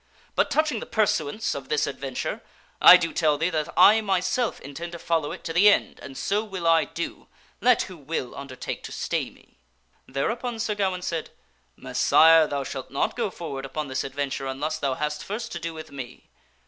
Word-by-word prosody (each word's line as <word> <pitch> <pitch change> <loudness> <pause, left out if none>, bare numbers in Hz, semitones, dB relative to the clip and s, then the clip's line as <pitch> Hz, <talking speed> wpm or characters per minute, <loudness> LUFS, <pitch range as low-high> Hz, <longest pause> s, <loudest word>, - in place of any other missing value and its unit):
But - - +2
touching 305 -7 +1
the - - -8
pursuance 210 -2 0
of - - -7
this 455 - +1
adventure, - - -4 0.4
I 180 - +11
do 165 -2 -3
tell 155 -3 +2
thee 165 +4 0
that 155 -2 -2
I 220 +2 +7
myself 200 +4 0
intend 165 +5 -7
to - - -5
follow 165 -3 -1
it - - -8
to 165 - -4
the 195 +5 +7
end 205 - +1
and 135 -1 -9
so 205 +2 0
will 190 -5 -6
I 165 -1 +4
do, 170 - -6 0.3
let 250 -2 +4
who 185 -2 -10
will 140 -4 -4
undertake 135 -2 -6
to - - -8
stay - - -2
me." - - -24 0.5
Thereupon 225 - -2
Sir 225 -1 -1
Gawaine 190 -3 -1
said, 165 -3 -3 0.3
" - - -41
Messire, 160 -1 +5
thou 140 -1 -2
shalt 135 -1 -6
not 140 - -1
go 230 -4 -1
forward 145 -7 -6
upon 145 +2 -4
this 130 0 -2
adventure 135 0 -3
unless 140 +4 -3
thou 135 -2 0
hast 150 +1 -3
first 225 +3 -5
to 170 - -4
do 165 0 -4
with 160 -1 -10
me." 130 -3 -9
165 Hz, 200 wpm, -25 LUFS, 140-200 Hz, 0.5 s, I